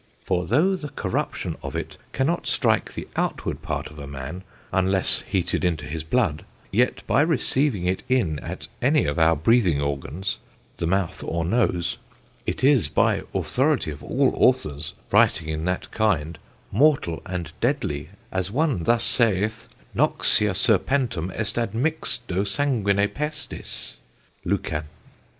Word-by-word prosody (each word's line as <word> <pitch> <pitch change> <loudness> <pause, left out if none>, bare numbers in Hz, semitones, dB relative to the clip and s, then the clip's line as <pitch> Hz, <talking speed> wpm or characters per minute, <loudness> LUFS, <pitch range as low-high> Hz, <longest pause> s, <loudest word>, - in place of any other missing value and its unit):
For 90 0 0
though 165 - +3
the 155 -5 -6
corruption - - -3
of - - -6
it - - -4 0.2
cannot 160 +6 0
strike - - +1
the - - -5
outward - - -2
part - - -3
of 75 0 -10
a 70 - -7
man, 70 +6 -6 0.3
unless 95 0 +2
heated - - 0
into 80 -4 0
his 80 +4 -4
blood; 80 -3 0 0.3
yet 120 +5 +1
by 115 +6 +3
receiving 135 - +1
it 90 +1 0
in 95 - +1
at - - -6
any - - +3
of 75 +2 -1
our 80 0 +5
breathing 90 -1 +3
organs 70 +6 -2 0.4
(the 85 - -1
mouth 95 -1 0
or 85 0 -2
nose) 90 -3 +1 0.5
it - - -2
is 135 - +5
by 75 - +2
authoritie 135 - +1
of 70 - -9
all - - +2
authors, 75 0 +2 0.2
writing 80 -1 +4
in 80 +1 -2
that 90 0 -2
kinde, 85 -8 0 0.3
mortall 130 - +3
and 90 -4 -4
deadlie, 80 - -1 0.2
as 95 -1 -1
one 130 - 0
thus 120 0 +3
saith: 110 -2 +1 0.3
"Noxia 105 -3 +3
serpentum 110 - +2
est 110 0 -2
admixto 120 - -1
sanguine 100 -5 +2
pestis. 150 +4 -5 0.5
LUCAN. 75 0 -1
95 Hz, 140 wpm, -24 LUFS, 80-125 Hz, 0.5 s, our